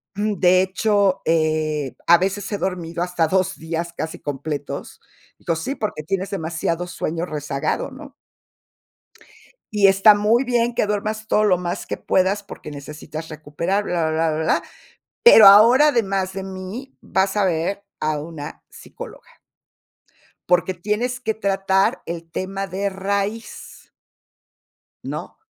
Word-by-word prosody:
"de 190 -3 +3
hecho, 200 0 +1
eh, 155 -3 0
a 170 0 +7
veces 195 +2 -2
he 205 - -1
dormido 175 -3 -3
hasta 175 -2 0
2 190 +2 +1
días 165 +1 -4
casi 160 - -4
completos. 145 0 -5 0.4
Dijo: 165 - -1
"Sí, 165 - -3
porque 210 - -4
tienes 190 +4 -3
demasiado 170 -1 -2
sueño 170 -1 -3
rezagado", 145 - -3
¿no? 280 +1 -12 1.6
"y 205 -2 +5
está 195 +2 +7
muy 215 +5 +2
bien 240 -1 +1
que 210 - +1
duermas 215 +1 -3
todo 215 - +3
lo 185 -4 +3
más 175 -1 -4
que - - -3
puedas 190 +2 +1
porque 200 - -10
necesitas 150 +2 -8
recuperar 155 +6 -2
bla, 170 -4 0
bla, 160 +1 +1
bla, - - -2
bla, 155 +1 -2
bla. - - +2 0.6
Pero 225 - +10
ahora, 235 +9 +8
además 195 -7 0
de 195 +1 -5
mí, 190 +8 -8
vas 190 +2 0
a 205 - +3
ver 180 +3 -1 0.2
a 155 -1 -1
una 150 -1 -8
psicóloga," - - -11 1.2
"porque 180 +1 +3
tienes 210 +8 -2
que 220 -3 -1
tratar 195 -2 +1
el 170 0 -5
tema 195 +4 -4
de 195 +2 -2
raíz". 200 +3 -4 1.2
¿No? - - -6
190 Hz, 140 wpm, -21 LUFS, 165-205 Hz, 1.6 s, Pero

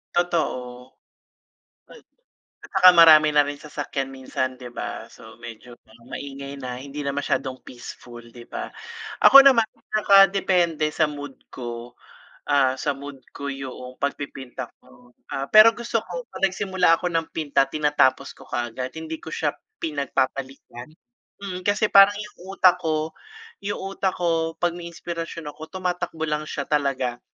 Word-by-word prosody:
Totoo, 130 -8 -2 1.7
tsaka 185 - +6
marami 155 -3 +7
na 145 -1 +3
rin 145 - -4
sasakyan 145 -2 -5
minsan, 130 -1 -4
'di 125 - -8
ba. - - -6
So, 110 +1 -15
medyo 120 +1 -11 0.3
maingay 140 0 -7
na, 125 -2 -5
hindi 140 +1 -8
na 140 -1 -3
masyadong 135 -2 -2
peaceful, 120 -1 -11
'di 120 +1 -13
ba. - - -4 0.6
Ako 275 - +11
naman 270 -4 +7 0.3
nakadepende 190 -6 +4
sa 155 0 +1
mood 145 -2 -8
ko, 120 -1 -8 0.5
ah, 135 -2 +3
sa 140 +1 -3
mood 140 -1 -10 0.2
ko 140 0 -4
'yong 130 -1 -9
pagpipinta 135 -2 -4 0.2
ko. 125 0 -21 0.2
Ah, 135 - -3
pero 215 +7 +7
gusto 230 -1 -1
ko' - - -7
pag - - -11
nagsimula 185 -3 +2
ako - - -7
ng 165 0 0
pinta 140 -3 0
tinatapos 150 -3 +1
ko - - -17
kaagad. 120 +2 -3
Hindi 160 +1 -7
ko - - -9
siya 150 -2 -1 0.2
pinagpapaliban. 135 -4 -3 0.5
Mm, 185 -2 -6
kasi 205 +1 +2
parang 200 +1 +7
yung 195 -2 -9
utak 185 -1 +5
ko 155 -1 -1 0.5
yung 200 +1 -3 0.2
utak 190 -1 -1
ko 165 -2 0
'pag 175 -1 0
may 175 0 -8
inspirasyon 165 -2 -6
ako 160 +2 -11
tumatakbo 180 -3 -3
lang 150 0 -3
siya 145 - -3
talaga. 135 -4 -1
150 Hz, 145 wpm, -23 LUFS, 130-175 Hz, 1.7 s, Ako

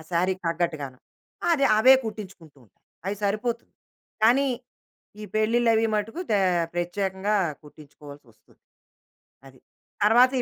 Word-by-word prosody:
శారీకి 185 +2 0
తగ్గట్టుగాను. 155 -6 -3 0.5
అది 285 -4 +2
అవే 260 +4 +8
కుట్టించుకుంటూ 190 -8 -9
ఉంటాను 105 - -33 0.2
అవి 200 +1 -2
సరిపోతుంది. 220 +4 -2 0.5
కానీ, 250 +5 +4 0.7
ఈ - - -6
పెళ్ళిళ్ళవి 225 +1 +2
మటుకు 215 - -3
దే 210 - +3 0.4
ప్రత్యేకంగా 190 +3 -1 0.3
కుట్టించుకోవాల్సి 145 -1 -14
వస్తుంది. 110 - -28 0.9
అది. 130 -1 -16 0.5
తరువాత 245 +5 +5
200 Hz, 105 wpm, -25 LUFS, 165-225 Hz, 0.9 s, అవే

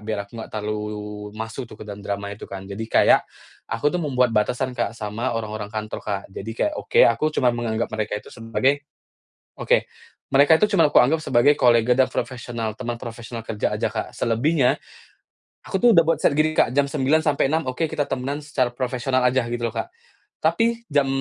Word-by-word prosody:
biar 105 0 -3
aku 100 - -26
nggak - - -8
terlalu 105 0 -3 0.6
masuk 115 +3 -5
tuh 110 - -12
ke - - -10
dalam 105 -1 -8
drama 100 0 -4
itu 105 - -10
kan 95 -1 -7
jadi 100 +2 -7
kayak, - - +5 0.5
aku 115 +7 0
tuh 180 - -1
membuat 125 -6 +1
batasan 125 +4 0
Kak 120 -2 -2
sama 115 +3 -3
orang-orang 110 -2 -4
kantor 110 0 -5
Kak 100 -2 -3
jadi 100 +3 -6
kayak 310 - 0
oke 475 - +2
aku - - +2
cuma 125 -2 +3
menganggap 115 -1 -2
mereka 110 -1 -2
itu 105 - -10
sebagai 125 +5 0 0.8
oke, - - +3 0.5
mereka 140 +3 +5
itu 210 - +7
cuma 165 - +6
aku - - +8
anggap 145 +6 +3
sebagai 145 +5 +4
kolega 120 0 +4
dan 130 - +5
profesional 115 -3 -4
teman 120 -1 -5
profesional 115 -1 -7
kerja 110 -1 -2
aja - - -1
Kak - - -5
selebihnya, 125 +4 +2 0.9
aku 190 - -2
tuh 240 - +7
udah 165 -6 +5
buat 165 - +1
ser 140 - +2
gini 155 0 +3
Kak, 120 - +3
jam 140 +2 +2
9.00 140 +1 +2
sampai 140 -2 +2
6.00 160 0 0
oke 150 +5 -1
kita 145 - -1
temenan 135 +3 -3
secara 130 -5 0
profesional 125 0 0
aja 130 +1 +2
gitu 120 0 -1
loh 115 - -5
Kak. 355 - -3 0.5
Tapi 230 0 +1
jam, 145 -1 +3
120 Hz, 195 wpm, -23 LUFS, 110-140 Hz, 0.9 s, aku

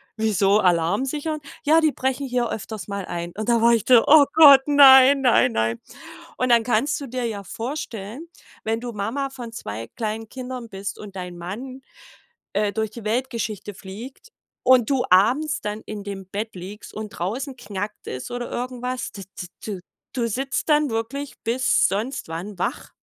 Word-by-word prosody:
wieso 210 -2 +2
Alarm 180 +4 +2
sichern? 305 +3 -3 0.3
Ja, 320 +2 +5
die 310 -2 +3
brechen 265 +2 -2
hier 245 -1 0
öfters 215 -1 -6
mal 200 -1 -4
ein.“ 170 0 -5
Und 215 +2 -3
da 235 -1 +3
war 235 +1 +5
ich 225 - +2
so: 245 -3 +7
„Oh 295 -1 +8
Gott, 285 -4 +9
nein, 275 -1 +8
nein, 235 - +4
nein.“ 115 +1 -1 0.6
Und 255 0 0
dann 235 -1 +5
kannst 250 +6 0
du 275 - -6
dir 250 0 -3
ja 205 -3 -4
vorstellen, 240 - -6 0.3
wenn 225 +1 -1
du 240 -1 -6
Mama 235 +7 -2
von 240 -3 -8
2 115 - -6
kleinen 220 0 -3
Kindern 250 -2 -7
bist 195 0 -6
und 200 -2 -9
dein 180 -1 -6
Mann, 245 +10 -7 0.7
äh, 210 -1 +1
durch 220 -1 -2
die 230 -1 -10
Weltgeschichte 220 -3 -2
fliegt 225 - -10 0.3
und 250 -3 +5
du 265 -3 +2
abends 255 +12 +3
dann 210 +1 -4
in 210 -2 -6
dem 195 -2 -7
Bett 210 +3 -5
liegst 200 +4 -9
und 215 -1 -6
draußen 250 - -4
knackt 210 -2 -6
es 130 - -6
oder 245 0 -4
irgendwas, 250 0 -4
d 195 -2 -8 0.2
d 180 - -7 0.2
du, 200 -4 -4 0.3
du 240 -3 0
sitzt 270 +7 -2
dann 300 -1 +4
wirklich 260 +6 -4
bis 255 +3 +3
sonst 215 +8 -3
wann 180 +4 -6
wach. - - -3
230 Hz, 175 wpm, -23 LUFS, 200-260 Hz, 0.7 s, Gott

